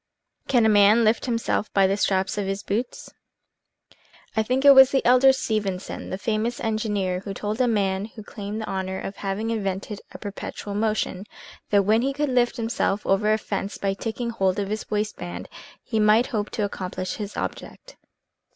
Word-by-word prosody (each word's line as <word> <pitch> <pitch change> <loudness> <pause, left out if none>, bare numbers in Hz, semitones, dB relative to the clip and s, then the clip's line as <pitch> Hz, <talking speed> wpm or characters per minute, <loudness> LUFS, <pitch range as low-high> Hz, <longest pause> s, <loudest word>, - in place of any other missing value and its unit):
CAN 240 -4 +3
A - - +5
MAN 210 +2 +6
LIFT 220 +3 +2
HIMSELF 230 -2 -1
BY 195 -1 +5
THE 195 +1 +2
STRAPS 190 -1 0
OF 200 - -2
HIS 195 0 -3
BOOTS? 230 +5 -4 1.2
THINK 250 +5 +1
it 280 - +10
was 265 -1 +9
the 270 - 0
elder 255 +2 +6
Stephenson, 210 -7 -3
the 185 - -3
famous 225 +3 -1
engineer, 210 -5 -1
who 195 +1 -7
told 215 +4 -2
a 250 - +3
man 195 -3 0
who 220 -1 -11
claimed 210 0 -6
the - - -4
honor 190 0 -3
of 195 - -6
having 205 +3 -2
invented 200 -1 -3
a - - -9
perpetual 205 0 -6
motion, 210 -2 -1 0.4
that 200 -1 +4
when 220 +3 +3
he 275 +2 0
could 290 +1 -1
lift 245 -1 +2
himself 225 -3 -1
over 205 +2 +2
a 215 - +3
fence 200 -2 -4
by 195 -1 -1
taking 235 +3 -4
hold 190 -4 0
of 200 -1 -2
his 215 +1 -4
waist 210 0 -1
band, 90 +1 -7 0.4
he 220 - -2
might 215 +3 +5
hope 210 -1 -1
to 210 - -1
accomplish 185 -2 -5
his 210 -2 -6
object. - - -6
210 Hz, 185 wpm, -24 LUFS, 195-230 Hz, 1.2 s, it